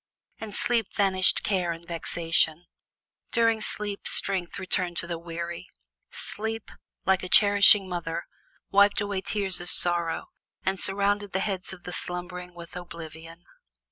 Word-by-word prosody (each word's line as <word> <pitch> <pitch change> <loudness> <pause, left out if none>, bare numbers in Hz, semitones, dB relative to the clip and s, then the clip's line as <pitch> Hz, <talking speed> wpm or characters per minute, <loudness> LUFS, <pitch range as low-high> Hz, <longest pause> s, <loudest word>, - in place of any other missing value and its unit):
In 220 -1 -7
sleep 230 +1 +3
vanished 190 -2 +2
care 185 -4 0
and 170 +1 -9
vexation, 165 -1 0 0.7
during 230 -1 +2
sleep 205 -1 +1
strength 185 -3 +3
returned 180 -2 -2
to - - +2
the 170 -1 -5
weary; 170 0 -7 0.4
sleep, 220 -3 -6 0.3
like 190 0 +2
a 185 - -7
cherishing 200 -1 +6
mother, 170 -2 -4 0.5
wiped 200 +1 +4
away 200 -2 -3
tears 195 -2 +1
of 175 - -6
sorrow 170 -2 0 0.4
and 190 0 -1
surrounded 200 +1 0
the 190 - 0
heads 190 -2 -4
of 185 -2 -11
the 180 - -7
slumbering 180 0 -6
with 170 0 -12
oblivion. 165 -1 -10
185 Hz, 140 wpm, -26 LUFS, 170-200 Hz, 0.7 s, cherishing